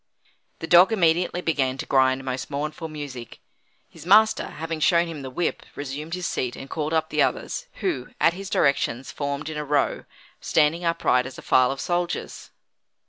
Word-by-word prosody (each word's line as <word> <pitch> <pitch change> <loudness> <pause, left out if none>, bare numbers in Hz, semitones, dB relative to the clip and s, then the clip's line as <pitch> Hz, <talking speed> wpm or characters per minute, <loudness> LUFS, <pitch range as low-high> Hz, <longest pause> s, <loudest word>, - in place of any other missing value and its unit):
The - - -6
dog 175 +5 +6
immediately 175 -3 +2
began 135 -6 0
to - - -5
grind 130 0 +2
most 130 0 -4
mournful 150 +3 -4
music. 145 -6 -8 0.5
His - - -14
master, 215 +5 +4
having 160 +1 -5
shown 170 +2 +4
him 165 -4 -7
the 130 - -6
whip, 170 +6 -2
resumed 145 +4 -5
his 180 -1 -5
seat 125 -7 -2
and 135 - -9
called 155 +2 -3
up 160 -1 0
the - - +2
others, - - -1
who, 370 -4 -1
at 165 - +4
his 195 +2 -7
directions, 135 - +1
formed 140 +1 -4
in 155 -1 -5
a 150 - -2
row, 145 0 0 0.3
standing 160 +2 +2
upright 165 -7 +1
as 135 - -10
a - - -10
file 130 -1 +4
of 135 - -5
soldiers. 175 +3 -3
155 Hz, 180 wpm, -24 LUFS, 135-170 Hz, 0.5 s, dog